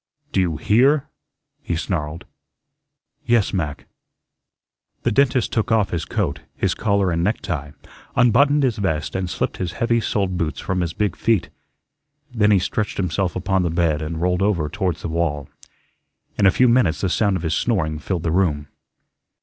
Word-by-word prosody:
"Do - - +1
you 85 -4 -1
HEAR?" 135 - +3 0.5
he 105 -11 -3
snarled. 75 0 -3 1.0
"Yes, 120 -4 +2
Mac." 75 -7 -3 1.2
The - - +1
dentist 130 0 +2
took 110 0 0
off 105 -5 +2
his 85 -3 -2
coat, - - -2 0.2
his - - 0
collar 100 -3 +1
and 85 0 0
necktie, 80 -7 -2 0.5
unbuttoned 140 +5 +4
his 120 -4 +1
vest, 80 -6 -1
and 95 -1 -2
slipped - - -2
his 90 -2 -3
heavy 115 +3 +1
soled 95 -5 -1
boots 80 -2 -2
from 95 -1 -2
his 85 -2 -2
big 105 -3 -1
feet. 115 -5 +1 0.8
Then 105 -3 +3
he 105 - +5
stretched 105 +3 -2
himself 90 0 -1
upon 95 +1 0
the 85 - 0
bed 80 -2 +1
and 80 +1 -4
rolled 90 +2 +1
over 90 -7 +1
towards 95 -3 -2
the - - -2
wall. 80 -4 -1 0.9
In 100 - +4
a - - +8
few 125 +6 +4
minutes 115 -10 +3
the 95 - +1
sound 100 +1 +1
of 85 - -7
his 80 -1 0
snoring 80 -6 0
filled 85 +2 -3
the 80 - 0
room. 75 -5 0
95 Hz, 170 wpm, -21 LUFS, 80-105 Hz, 1.2 s, a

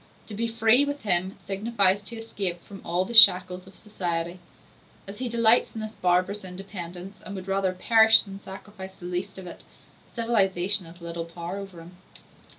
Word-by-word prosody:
To 215 - -10
be 230 +3 -2
free, 230 +3 +4
with 285 0 -4
him, 185 -2 0
signifies 200 0 +1
to 220 +4 -8
escape 195 -6 -4
from 195 -1 -12
all 175 +2 -1
the 235 - -8
shackles 185 -4 +7
of 190 - -16
society. 175 -4 -4 0.7
As 200 +3 -9
he 255 -1 -3
delights 230 0 +3
in 220 - -5
this 215 0 -6
barbarous 185 +1 0
independence, 185 0 -9
and 200 - -8
would 190 0 -8
rather 195 -1 0
perish 220 +3 +5
than 195 -1 -10
sacrifice 190 -1 -11
the 175 - -12
least 180 +2 -4
part 190 - -10
of - - -9
it, - - -19 0.5
civilization 200 -5 +1
has 170 +2 -15
little 170 0 -6
power 170 +2 -7
over 195 -4 -9
him. 175 +2 -15
195 Hz, 180 wpm, -25 LUFS, 180-215 Hz, 0.7 s, shackles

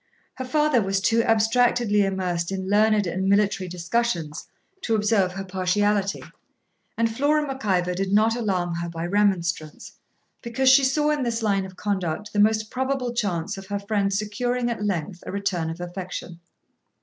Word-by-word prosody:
Her 260 - -6
father 300 -1 +2
was 195 -1 0
too 225 +4 +2
abstractedly 225 -1 +3
immersed 185 -3 -2
in 190 -1 -3
learned 210 0 +3
and 190 +2 -1
military 200 -2 +2
discussions 175 -3 -2 0.3
to 225 - 0
observe 210 -3 +2
her 195 0 -5
partiality, 195 +2 0 0.7
and 230 0 +2
Flora 295 +3 +2
Mac 270 -3 -6
Ivor 180 -3 +1
did 190 +1 -2
not 220 +2 +3
alarm 185 -7 -1
her 170 0 -3
by 165 0 -5
remonstrance, 175 -5 -1 0.5
because 260 +2 +1
she 270 +1 +7
saw 295 +3 +2
in 300 -2 0
this 235 -2 -1
line 200 -3 +1
of 185 - -14
conduct 200 0 -3
the 205 - 0
most 215 +1 +2
probable 260 -1 -1
chance 195 -6 -2
of 195 - -11
her 205 0 -2
friend 200 -1 -1
securing 240 +4 -1
at 225 -3 -4
length 180 -3 -3
a - - -4
return 185 -4 -2
of 165 +2 -6
affection. 175 -1 -6
205 Hz, 165 wpm, -24 LUFS, 185-230 Hz, 0.7 s, she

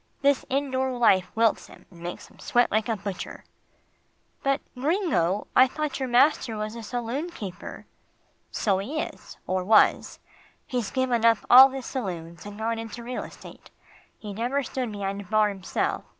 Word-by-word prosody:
This 280 -1 +3
indoor 265 -1 0
life 190 -6 +4
wilts 225 -1 +2
him, - - -16
and 175 - -15
makes 175 +1 -6
him - - -22
sweat 245 0 +2
like 220 +2 0
a 225 - 0
butcher." 200 -1 -6 1.0
"But, 275 +1 +1 0.2
Gringo, 265 - 0
I 255 - +7
thought 300 +2 -3
your 260 -1 -2
master 245 -2 +3
was 215 +1 -4
a 230 - -7
saloon 245 +8 -3
keeper?" 200 - -8 0.6
"So 195 -3 0
he 280 +11 -3
is, - - -7
or 185 0 -1
was. 215 +3 +4 0.5
He's 245 -4 -2
given 255 -3 0
up 230 -2 +4
all 260 +2 +11
his 265 -1 -6
saloons, 170 - -5
and 205 0 -9
gone 225 +1 -2
into 225 +1 -7
real 250 +1 -4
estate. - - -13 0.5
He 210 -2 -8
never 245 +7 -1
stood 250 -1 -3
behind 200 -1 -4
a - - -11
bar 215 +1 +3
himself. 195 -2 -2
230 Hz, 165 wpm, -26 LUFS, 205-260 Hz, 1.0 s, all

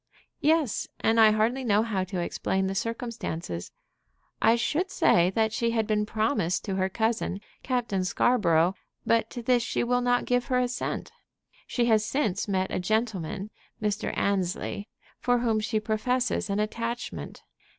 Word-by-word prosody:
"Yes; 305 -6 +2
and 225 +1 +3
I 220 -1 +8
hardly 225 +5 +1
know 215 -2 +3
how 205 -5 -1
to 185 -1 -4
explain 190 +2 -1
the 190 - -1
circumstances. 195 - -4 0.7
I 225 - +5
should 305 +10 0
say 175 - +4
that 220 -1 +2
she 235 +1 +1
had 220 - +2
been 210 0 0
promised 215 -5 0
to 195 - -2
her 190 0 +1
cousin, 220 -2 -1 0.2
Captain 235 -7 -1
Scarborough; 180 -4 +3 0.3
but 225 -1 +2
to 240 - -7
this 245 0 +3
she 235 - -1
will 245 +1 +1
not 245 0 +2
give 245 0 +1
her 255 - +1
assent. 250 0 -2 0.6
She 240 - +1
has 220 -2 +4
since 215 -6 -1
met 190 -2 0
a - - -1
gentleman, 205 -1 -1 0.3
Mr. 210 -1 -1
Annesley, 200 +1 -1 0.3
for 245 0 +2
whom 230 -2 +1
she 215 +1 0
professes 220 +1 0
an 200 +1 0
attachment. 230 +3 -4
220 Hz, 155 wpm, -27 LUFS, 195-240 Hz, 0.7 s, I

